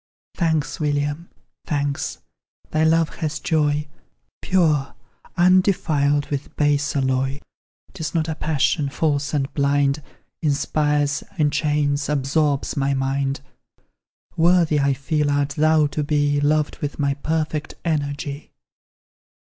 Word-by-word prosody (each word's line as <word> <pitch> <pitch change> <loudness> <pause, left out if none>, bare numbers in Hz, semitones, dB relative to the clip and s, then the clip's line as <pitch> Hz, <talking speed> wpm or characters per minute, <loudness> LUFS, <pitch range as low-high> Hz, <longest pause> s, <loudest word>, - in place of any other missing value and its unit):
Thanks, 160 -4 0
William, 145 +2 -1 0.4
thanks! 145 -1 -2 0.5
thy 155 0 +2
love 160 0 +2
has 155 -2 -2
joy, 150 -2 +1 0.5
Pure, 155 -7 +1 0.4
undefiled 170 -6 +3
with 145 0 -4
base 145 0 +1
alloy; 130 0 0 0.5
'Tis 165 -3 -5
not 160 -1 +1
a 160 - -1
passion, 150 -1 0
false 145 0 0
and 140 -2 -1
blind, 140 0 +1 0.4
Inspires, 150 0 +1
enchains, 145 -1 +1
absorbs 145 0 0
my 140 0 +1
mind; 135 +1 -1 0.9
Worthy, 170 -2 +3
I 140 -1 +2
feel, 150 +2 0
art 145 0 +1
thou 155 +1 +3
to 150 +1 -2
be 145 -1 +1
Loved 150 +1 +1
with 145 0 -4
my 140 -2 +1
perfect 155 +1 -2
energy. 145 -2 -3
145 Hz, 110 wpm, -22 LUFS, 140-155 Hz, 0.9 s, undefiled